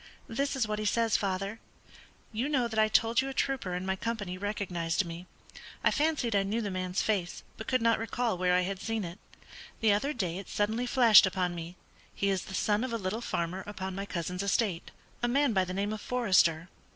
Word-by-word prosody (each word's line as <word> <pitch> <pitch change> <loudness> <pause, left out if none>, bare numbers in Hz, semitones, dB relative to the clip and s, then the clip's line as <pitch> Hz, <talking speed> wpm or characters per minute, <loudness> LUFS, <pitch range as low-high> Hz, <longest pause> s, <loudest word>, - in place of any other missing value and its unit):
"This 275 +5 -1
is 250 -5 +1
what 210 0 -2
he 215 - -3
says, 230 +1 +2
father: 195 +2 -1 0.7
'You 235 +6 -1
know 260 -5 +2
that 220 -1 -2
I 215 - +5
told 225 +2 +3
you 270 - -3
a 270 - -7
trooper 250 -11 -1
in 180 +1 -3
my 190 0 0
company 205 -3 -3
recognised 185 -3 -1
me. 170 +2 -8 0.6
I - - +4
fancied 290 -7 +1
I 200 - +4
knew 200 +4 -1
the 205 -3 -2
man's 185 0 -1
face, 190 -5 -1
but 220 - -8
could 255 -3 +1
not 230 -1 +3
recall 225 0 -1
where 180 0 +2
I 180 - +4
had 190 +1 -3
seen 225 -2 -2
it. 175 +3 -7 0.6
The 220 -2 +4
other 240 +8 0
day 185 - -2
it 195 - -10
suddenly 220 +4 0
flashed 235 -6 +7
upon 180 -2 -1
me; 170 +1 -7 0.4
he 200 0 +1
is 190 -2 -1
the 190 - -6
son 210 +4 +1
of 255 - -3
a 230 - 0
little 205 +2 -3
farmer 180 -3 -2
upon 190 -2 -5
my 195 +2 -5
cousin's 180 0 -3
estate, 200 -3 0 0.3
a 240 - +2
man 275 0 +2
by 190 -2 +3
the 185 - -5
name 200 +3 -1
of 215 - -6
Forester. 185 -9 +2
205 Hz, 220 wpm, -30 LUFS, 185-230 Hz, 0.7 s, flashed